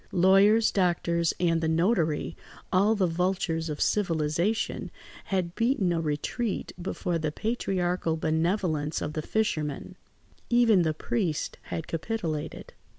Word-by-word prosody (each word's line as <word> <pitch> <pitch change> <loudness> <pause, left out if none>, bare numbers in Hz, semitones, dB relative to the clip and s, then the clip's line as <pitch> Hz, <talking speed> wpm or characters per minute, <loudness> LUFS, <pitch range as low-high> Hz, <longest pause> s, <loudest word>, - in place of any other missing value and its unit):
Lawyers, 195 +5 +5
doctors, 170 -3 +1
and 165 -2 +2
the 160 - 0
notary, 160 -1 +1 0.4
all 200 +4 +4
the 195 -3 +2
vultures 170 -1 -1
of 150 -1 -4
civilisation, 170 +2 0 0.4
had 185 -3 -1
beaten 230 -6 +1
a 165 - 0
retreat 165 - -2
before 175 -1 -2
the 155 -1 -1
patriarchal 180 -5 -1
benevolence 160 -1 0
of 150 - -4
the 155 - -2
fisherman. 155 -5 -2 0.5
Even 235 -5 +5
the 160 -2 0
priest 170 -4 -2
had 160 - -4
capitulated. 165 -3 -4
175 Hz, 120 wpm, -27 LUFS, 160-200 Hz, 0.5 s, Lawyers